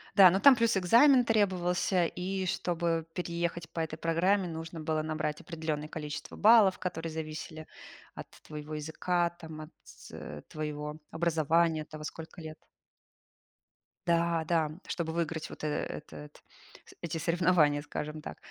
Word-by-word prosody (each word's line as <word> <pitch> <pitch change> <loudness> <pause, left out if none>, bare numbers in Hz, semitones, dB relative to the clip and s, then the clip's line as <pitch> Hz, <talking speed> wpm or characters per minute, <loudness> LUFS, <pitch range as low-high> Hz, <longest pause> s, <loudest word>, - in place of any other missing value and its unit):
Да, 195 -3 +10
ну 190 +3 +1
там 280 +1 +8
плюс 230 -3 +2
экзамен 245 +8 +6
требовался. 185 -4 +2
И 185 +2 -3
чтобы 170 -2 -1
переехать 170 -1 -3
по 165 - -3
этой 155 -1 -4
программе, 180 +4 +2
нужно 165 0 -6
было 155 0 -1
набрать 155 -1 -3
определенное 155 -3 -4
количество 150 -1 -6
баллов, 210 -3 +6
которые 165 -3 -4
зависели 155 0 -6 0.5
от - - -8 0.2
твоего 150 0 -6
языка, 170 +3 0
там 160 -2 -10
от 155 - -9 0.2
т - - -13 0.2
т - - -10
э, 75 0 -8
твоего 150 0 -5
образования, 165 0 +2
от - - -10
того, 155 0 -8
сколько 165 +1 -8
лет. 155 -1 -8 1.5
Да-да. 165 -2 +2 0.2
Чтобы 160 -2 -3
выиграть 165 -1 -2
вот, - - -10
э, 155 - 0
этот 150 0 -6 0.4
с - - -15
эти 165 -1 -3
соревнования, 165 -3 +3
скажем 150 +1 -5
так. - - -8
165 Hz, 145 wpm, -30 LUFS, 155-180 Hz, 1.5 s, Да